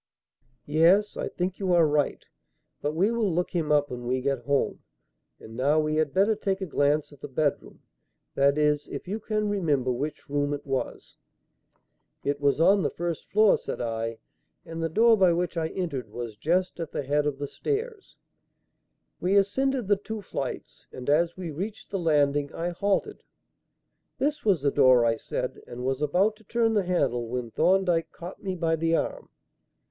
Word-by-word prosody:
"Yes, 170 Hz, +8 st, +4 dB
I -, -, -3 dB
think 180 Hz, +1 st, -3 dB
you 190 Hz, -3 st, +1 dB
are 170 Hz, -2 st, +5 dB
right; 150 Hz, -1 st, 0 dB, 0.6 s
but 150 Hz, +1 st, -2 dB
we 195 Hz, +7 st, +2 dB
will 230 Hz, -5 st, 0 dB
look 175 Hz, +2 st, -1 dB
him 160 Hz, -4 st, -1 dB
up 145 Hz, -1 st, +3 dB
when 120 Hz, -1 st, -6 dB
we 130 Hz, +1 st, +1 dB
get 130 Hz, -2 st, -2 dB
home. 140 Hz, 0 st, 0 dB, 0.6 s
And 110 Hz, -, -12 dB
now 140 Hz, +5 st, +2 dB
we 155 Hz, 0 st, 0 dB
had 155 Hz, -2 st, +1 dB
better 200 Hz, +6 st, +3 dB
take 195 Hz, -2 st, -2 dB
a 190 Hz, -, -3 dB
glance 145 Hz, -2 st, +1 dB
at 145 Hz, -, -18 dB
the -, -, -6 dB
bedroom; 145 Hz, +1 st, -2 dB, 0.5 s
that 140 Hz, +1 st, +3 dB
is, 150 Hz, -1 st, +2 dB
if -, -, -7 dB
you 210 Hz, +4 st, -3 dB
can 215 Hz, 0 st, -1 dB
remember 150 Hz, -11 st, +1 dB
which 145 Hz, +5 st, -4 dB
room 145 Hz, 0 st, 0 dB
it 145 Hz, -, -10 dB
was." 135 Hz, -2 st, -4 dB, 1.1 s
"It 145 Hz, 0 st, -1 dB
was 140 Hz, +1 st, +2 dB
on 195 Hz, +4 st, +5 dB
the 155 Hz, -, +1 dB
first 170 Hz, -1 st, -4 dB
floor," 215 Hz, 0 st, +4 dB
said -, -, -5 dB
I, 115 Hz, -1 st, -3 dB, 0.5 s
"and 165 Hz, 0 st, -6 dB
the 165 Hz, -, 0 dB
door 225 Hz, +7 st, +5 dB
by 185 Hz, -3 st, +5 dB
which 175 Hz, +1 st, -1 dB
I 160 Hz, -1 st, 0 dB
entered 150 Hz, -, -4 dB
was 115 Hz, 0 st, -6 dB
just 175 Hz, -, 0 dB
at 165 Hz, -2 st, -4 dB
the -, -, -3 dB
head 145 Hz, +2 st, +1 dB
of 145 Hz, -2 st, -2 dB
the 145 Hz, -, -3 dB
stairs." 430 Hz, -, -4 dB, 1.0 s
We 185 Hz, +3 st, +1 dB
ascended 245 Hz, +4 st, +1 dB
the 205 Hz, -1 st, +3 dB
two 215 Hz, +1 st, -6 dB
flights, -, -, -6 dB
and, 130 Hz, +2 st, -3 dB
as 170 Hz, +4 st, +2 dB
we 175 Hz, -3 st, -5 dB
reached 200 Hz, +8 st, -6 dB
the 195 Hz, -, -1 dB
landing, 145 Hz, -3 st, +2 dB
I 170 Hz, +1 st, -2 dB
halted. 200 Hz, -, -1 dB, 1.0 s
"This 290 Hz, +1 st, -1 dB
was 190 Hz, -9 st, +2 dB
the 140 Hz, -, +3 dB
door," 125 Hz, -3 st, +5 dB
I 115 Hz, -1 st, +2 dB
said, -, -, -4 dB
and 125 Hz, +1 st, -7 dB
was 135 Hz, +1 st, -1 dB
about 190 Hz, +9 st, +2 dB
to 220 Hz, -, -21 dB
turn 230 Hz, +1 st, +1 dB
the 205 Hz, -3 st, +1 dB
handle 130 Hz, -10 st, 0 dB
when 120 Hz, -1 st, -4 dB
Thorndyke 180 Hz, -, +2 dB
caught 175 Hz, +2 st, -9 dB
me 190 Hz, -2 st, -3 dB
by 165 Hz, -2 st, +1 dB
the 165 Hz, +1 st, +1 dB
arm. -, -, -3 dB
165 Hz, 185 wpm, -27 LUFS, 140-195 Hz, 1.1 s, are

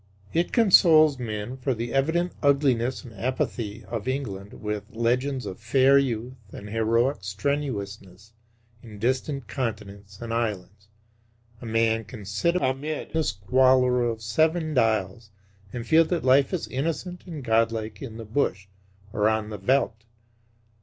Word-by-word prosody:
It 170 Hz, +2 st, +1 dB
consoles 160 Hz, -, +6 dB
men 110 Hz, +1 st, -4 dB
for 130 Hz, 0 st, -1 dB
the 115 Hz, +1 st, -4 dB
evident 160 Hz, +6 st, +1 dB
ugliness 135 Hz, -4 st, +2 dB
and 120 Hz, -, -11 dB
apathy 115 Hz, -1 st, -3 dB
of 115 Hz, 0 st, -5 dB
England 105 Hz, -7 st, -4 dB
with 105 Hz, -2 st, -4 dB
legends 125 Hz, +3 st, 0 dB
of 95 Hz, -, -7 dB
fair 130 Hz, +4 st, +4 dB
youth 125 Hz, -2 st, -2 dB, 0.2 s
and 105 Hz, -, -9 dB
heroic 115 Hz, +4 st, +1 dB
strenuousness 100 Hz, -2 st, -4 dB, 0.5 s
in 110 Hz, -3 st, -12 dB
distant 130 Hz, +3 st, -1 dB
continents 105 Hz, -5 st, -5 dB
and 115 Hz, -1 st, -5 dB
islands. 105 Hz, -3 st, -3 dB, 0.7 s
A 120 Hz, -, -7 dB
man 115 Hz, 0 st, +1 dB
can 110 Hz, -2 st, -10 dB
sit 135 Hz, -, 0 dB
amid 145 Hz, -1 st, -2 dB
the 160 Hz, 0 st, +1 dB
squalor 125 Hz, +4 st, +3 dB
of 115 Hz, -1 st, -3 dB
Seven 155 Hz, +7 st, +1 dB
Dials 110 Hz, -3 st, 0 dB, 0.4 s
and 120 Hz, -1 st, -5 dB
feel 160 Hz, +3 st, +5 dB
that 175 Hz, 0 st, -2 dB
life 135 Hz, +1 st, +4 dB
is 185 Hz, -, -2 dB
innocent 165 Hz, +7 st, -4 dB
and 155 Hz, -5 st, -7 dB
godlike 115 Hz, -1 st, 0 dB
in 115 Hz, -5 st, -7 dB
the 115 Hz, -, -7 dB
bush 105 Hz, -4 st, -1 dB, 0.5 s
or 105 Hz, +1 st, +2 dB
on 110 Hz, -1 st, -1 dB
the 105 Hz, -, -6 dB
veldt. 125 Hz, -4 st, +1 dB
120 Hz, 140 wpm, -25 LUFS, 110-140 Hz, 0.7 s, consoles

